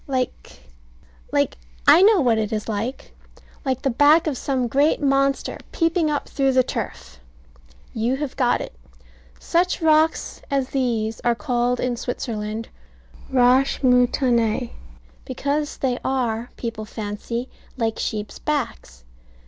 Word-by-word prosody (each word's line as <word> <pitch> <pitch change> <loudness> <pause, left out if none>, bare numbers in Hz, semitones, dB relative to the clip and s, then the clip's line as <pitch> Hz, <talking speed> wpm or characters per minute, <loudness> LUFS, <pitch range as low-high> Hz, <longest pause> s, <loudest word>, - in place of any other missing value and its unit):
Like 255 - -3 0.7
like - - 0 0.3
I 350 - +8
know 405 -2 +6
what 235 -4 +3
it 215 0 -2
is 215 -1 -3
like. 225 +4 -4 0.5
Like 260 -2 -2
the 270 - +1
back 295 +6 +5
of 305 -4 -1
some 255 -1 -1
great 280 +6 +2
monster 275 -1 +1
peeping 330 -1 +1
up 295 -1 -2
through 270 -1 +1
the 255 0 +4
turf. 65 - -6 0.7
You 230 +3 0
have 275 -1 -4
got 250 -3 +2
it. - - -7 0.7
Such 355 +2 +1
rocks 315 -1 +2
as 270 -2 0
these 230 -5 -1
are 240 -1 +1
called 245 -1 0
in 250 -1 -1
Switzerland 220 -2 -4 0.6
"roches 260 +2 +3
moutonnees," 245 -2 +2 0.5
because 290 - -2
they 255 -2 -1
are, 240 -3 -1
people 230 -2 -5
fancy, 220 +3 -5 0.3
like 225 -2 -1
sheep's 210 -1 -4
backs. 230 - -3
250 Hz, 130 wpm, -22 LUFS, 230-275 Hz, 0.7 s, I